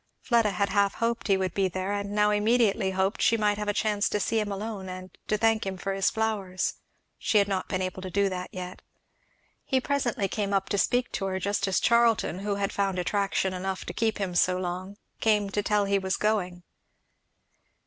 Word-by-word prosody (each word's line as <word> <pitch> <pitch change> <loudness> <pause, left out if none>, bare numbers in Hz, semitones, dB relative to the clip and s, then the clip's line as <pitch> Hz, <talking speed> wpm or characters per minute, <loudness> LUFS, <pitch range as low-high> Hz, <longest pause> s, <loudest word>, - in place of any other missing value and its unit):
Fleda 235 -3 +2
had 200 +1 0
half 200 0 +2
hoped 230 0 -1
he 195 -2 +4
would 185 -2 -1
be 195 -1 +2
there, 185 +2 -3
and 200 0 -3
now 210 0 +3
immediately 210 -1 +2
hoped 190 +2 0
she 230 - +4
might 210 -1 +1
have 210 - -3
a - - +3
chance 205 -1 +1
to 210 - 0
see 225 +2 +1
him 210 -1 -2
alone 200 -1 -5
and 185 0 -8
to 215 - +1
thank 225 0 +2
him 190 -1 -4
for 195 +2 -3
his 195 -1 +2
flowers; 205 -5 -1 0.5
she 215 - +2
had 200 -1 +4
not 195 -2 -2
been 185 -1 -1
able 185 0 -4
to 185 - -5
do 200 +2 +2
that 185 -1 -4
yet. 180 0 -7 0.8
He 265 - +1
presently 255 -7 0
came 200 0 -2
up 195 -1 0
to 200 - +1
speak 245 +4 +1
to 195 - -2
her 190 -1 -1
just 200 +1 0
as 190 - +2
Charlton, 235 -6 +3
who 200 0 -1
had 200 0 -2
found 195 -2 0
attraction 195 +1 0
enough 190 +1 -3
to - - -5
keep 225 -1 0
him 195 -3 -2
so 180 +1 +3
long, 185 +2 -4 0.2
came 210 -2 +2
to 205 - 0
tell 205 0 +1
he 200 0 +2
was 190 -1 -1
going. 185 -5 -1
200 Hz, 215 wpm, -27 LUFS, 190-210 Hz, 0.8 s, he